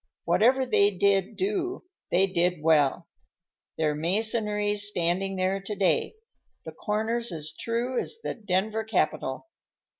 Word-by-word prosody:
Whatever 260 +4 +3
they 205 -4 +4
did 195 -1 +1
do, 375 -1 -2 0.3
they 185 +2 +3
did 180 -3 0
well. 160 +1 +3 0.7
Their 155 -2 +1
masonry's 210 +4 +1
standing 190 0 0
there 190 +1 -1
to 205 +2 -5
day, 185 - +1 0.5
the - - -6
corners 225 +2 -2
as 155 -2 -4
true 240 +2 -2
as 450 - -3
the - - -2
Denver 210 +1 -1
Capitol. 195 - -1
200 Hz, 125 wpm, -26 LUFS, 180-220 Hz, 0.7 s, they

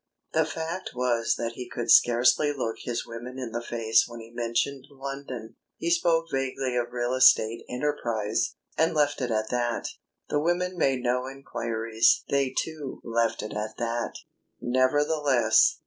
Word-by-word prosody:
The 160 0 +3
fact 165 +2 -5
was 120 -2 +1
that 115 -1 -2
he 125 +1 -8
could 120 - -1
scarcely 120 +5 +5
look 120 -6 -3
his 120 -1 -3
women 120 +3 -8
in 125 -3 -5
the 120 +1 -3
face 115 -2 +2
when 120 0 -9
he 115 0 -11
mentioned 120 +4 -2
London. 135 -5 -7 0.2
He 170 - -1
spoke 170 -1 +3
vaguely 135 -1 -1
of 120 0 -1
"real 120 0 -1
estate" 115 -3 +5
enterprise, 120 -6 -1 0.2
and 165 0 +2
left 145 -2 +2
it 125 - -1
at 110 -1 -1
that. 120 -1 -1 0.4
The 145 - 0
women 175 +3 0
made 135 -7 +1
no 125 +1 0
enquiries; 115 -4 +1
they 140 -1 +2
too, 155 -4 -3
left 115 -2 0
it 105 - -6
at 105 +1 -4
that. 120 0 -2 0.4
Nevertheless.... 130 -1 +3
125 Hz, 155 wpm, -27 LUFS, 115-140 Hz, 0.4 s, scarcely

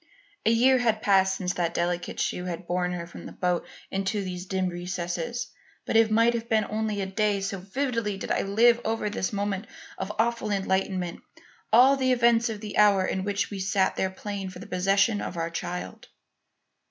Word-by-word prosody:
A - - +7
year 250 +3 +5
had 225 -3 +1
passed 190 -1 +4
since 180 -2 -2
that 170 -1 -1
delicate 175 0 -2
shoe 180 - -1
had 175 0 -5
borne 180 0 -1
her 170 -1 -4
from 170 - -10
the - - -9
boat 180 -1 -1 0.2
into 195 +1 -1
these 180 0 -6
dim 190 -1 0
recesses; 175 +4 -4 0.3
but - - -2
it 225 -1 +6
might 230 +2 +4
have 235 0 -4
been 220 -2 +3
only 215 -1 -2
a - - -1
day, 205 +1 0
so 195 0 -3
vividly 230 0 -2
did - - -5
I - - +2
live 230 +4 +4
over 225 0 -1
in 210 - -1
this 190 - -2
moment 200 0 -2 0.3
of 195 - -3
awful 230 0 0
enlightenment 190 -3 -1 0.5
all 255 +5 +7
the 260 -1 +2
events 235 -1 +3
of 215 -2 -5
the 210 -1 -3
hour 200 -3 +5
in 190 - -2
which 200 +1 -1
we 200 - -5
sat 190 0 +1
there 190 - 0
playing 195 0 -5
for 185 - -10
the - - -9
possession 195 +4 +2
of 175 - -5
our 165 0 -2
child. 180 +1 -5
200 Hz, 200 wpm, -26 LUFS, 185-225 Hz, 0.5 s, A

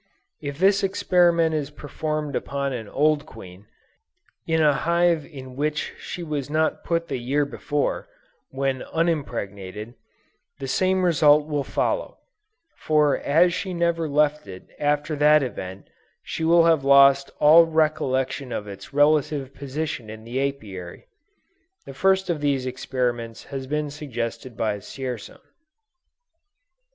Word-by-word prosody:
If 140 -2 -5
this 195 +3 +4
experiment 175 -4 +3
is 150 -2 -2
performed 150 0 -4
upon 140 -1 -2
an 110 -4 -6
old 150 +1 +1
queen, 90 +2 -13 0.8
in 160 -1 +2
a 150 -2 +5
hive 170 +1 +1
in 130 -5 -10
which 150 +2 -2
she 175 - -6
was 150 -4 -4 0.3
put 170 0 -1
the - - -3
year 140 +4 0
before, 145 - -2 0.4
when 135 -1 -2
unimpregnated, 115 - -3 0.6
the 135 - -6
same 185 +6 +1
result 150 -3 +5
will 145 -2 -1
follow; - - -2 0.6
for 150 -2 +2
as 170 +5 +3
she 185 0 -3
never 170 -2 0
left 150 -3 +1
it 95 -1 -11
after 150 +1 0
that 150 0 +5
event, 95 -6 -6 0.4
she 165 - -5
will 165 +1 +5
have 165 -4 +3
lost 140 0 +6
all 165 +3 +7
recollection 140 -5 0
of 105 - -3
its 100 +7 -10
relative 145 -2 +2
position 140 -4 -5
in 110 0 -9
the 120 +3 -4
Apiary. 95 -10 -10 0.8
The 135 - -9
first 190 +5 +2
of 165 -4 -2
these 140 -3 0
experiments 125 -3 -3
has 135 -1 -6
been 150 +1 -2
suggested 125 -4 -5
by 105 -2 -1
Dzierzon. 125 +1 -7
145 Hz, 130 wpm, -24 LUFS, 130-160 Hz, 0.8 s, all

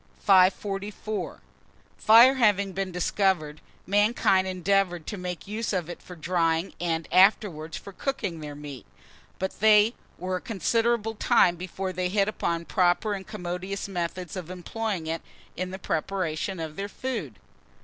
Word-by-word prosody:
544. 200 +2 +1 0.5
FIRE 235 +4 +7
HAVING 205 -6 +2
BEEN 190 0 -3
DISCOVERED, 175 -4 0 0.2
mankind 200 -2 +3
endeavoured 185 -2 0
to - - -4
make 180 -2 -6
use 215 +1 -3
of 175 -2 -2
it - - -10
for 180 - -11
drying, 165 +1 0
and 165 -2 -1
afterwards 185 -5 +3
for 200 - -10
cooking 200 - -3
their 150 -1 -7
meat; 145 -3 -9 0.5
but 190 0 -4
they 215 +1 +6 0.2
were 185 +1 -2
a - - -9
considerable 225 +2 0
time 180 -4 +3
before 185 +2 -5
they 180 0 -1
hit 200 +1 +2
upon 170 -5 -2
proper 180 +4 +2
and 190 -2 -6
commodious 180 +3 -4
methods 180 -2 -4
of 180 -3 -6
employing 185 0 -4
it 165 +1 -3 0.3
in 185 +1 -3
the 190 - -6
preparation 180 0 -2
of 155 -1 -6
their 200 +1 -4
food. 205 - -5
185 Hz, 145 wpm, -26 LUFS, 170-205 Hz, 0.5 s, FIRE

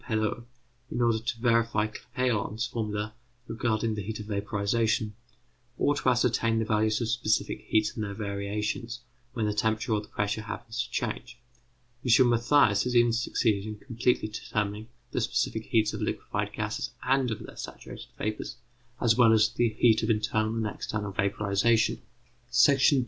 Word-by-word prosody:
Perot, 110 0 -1 0.4
in - - -3
order 115 -2 +3
to 115 +1 -4
verify 115 -2 +2
Clapeyron's 110 0 -2
formula 105 -3 -3 0.3
regarding 115 -1 0
the 105 - -3
heat 110 +2 -5
of 105 - -6
vaporization, 105 +1 0 0.6
or 145 - +3
to 140 - +1
ascertain 120 -2 +2
the 110 - +1
values 110 0 +1
of 115 - 0
specific 110 -1 0
heats 110 -1 +2
and 110 - -3
their 100 -1 -4
variations 105 +3 -3 0.3
when 115 -3 -1
the 105 - 0
temperature 110 +2 0
or 105 - +1
the 105 - -13
pressure 105 +1 -2
happens 115 +2 -4
to 120 - -11
change. 120 +1 -4 0.7
M. 125 0 +5
Mathias 120 -3 +4
has 125 0 -1
even 120 -1 +5
succeeded 110 -3 0
in 105 -1 -6
completely 120 0 0
determining 105 0 -3 0.2
the - - -1
specific 115 -1 -1
heats 110 -2 +2
of - - -5
liquefied - - -2
gases - - -3
and 130 0 +2
of 110 - -4
their - - -12
saturated - - -9
vapours, 110 0 -3 0.4
as 115 -3 +3
well 120 -2 +6
as 110 0 +4
the 120 -1 +2
heat 110 0 +3
of 110 - -1
internal 110 0 +1
and 115 -1 -1
external 105 -1 -3
vaporization. 100 +2 +1 0.5
§ 130 +3 +6
2. 140 - +3
110 Hz, 165 wpm, -28 LUFS, 105-120 Hz, 0.7 s, well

